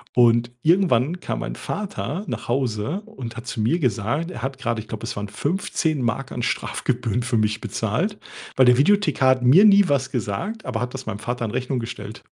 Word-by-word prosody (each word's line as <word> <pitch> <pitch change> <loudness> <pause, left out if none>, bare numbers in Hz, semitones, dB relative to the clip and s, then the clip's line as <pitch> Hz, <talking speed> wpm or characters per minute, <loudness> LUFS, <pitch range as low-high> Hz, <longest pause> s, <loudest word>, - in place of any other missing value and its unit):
und 120 0 +4
irgendwann 170 -2 +3
kam - - -3
mein - - -4
Vater 200 -3 -4
nach - - -5
Hause 130 - -1
und 125 - -8
hat 115 +2 -8
zu 115 - -3
mir 155 +11 +2
gesagt, 125 - -1
er 115 - -7
hat 135 +1 -3
gerade, 115 -4 -2
ich 110 - -14
glaube, 110 0 -5
es - - -4
waren 105 0 -4
15 155 - -1
Mark 125 +3 -2
an 120 - -3
Strafgebühren 120 +2 -1
für 120 -2 0
mich 110 +1 0
bezahlt, 115 - -2 0.4
weil 130 - +6
der 125 0 +6
Videothekar 155 -5 +3
hat 130 -1 +3
mir 155 +12 +7
nie 200 -2 +7
was 135 -2 0
gesagt, 125 - -3
aber 125 -2 -2
hat 125 +1 -3
das 135 -1 -6
meinem 105 -2 -4
Vater 120 +1 -3
in 105 - -4
Rechnung 125 +1 -1
gestellt. 115 - -7
125 Hz, 205 wpm, -23 LUFS, 115-155 Hz, 0.4 s, mir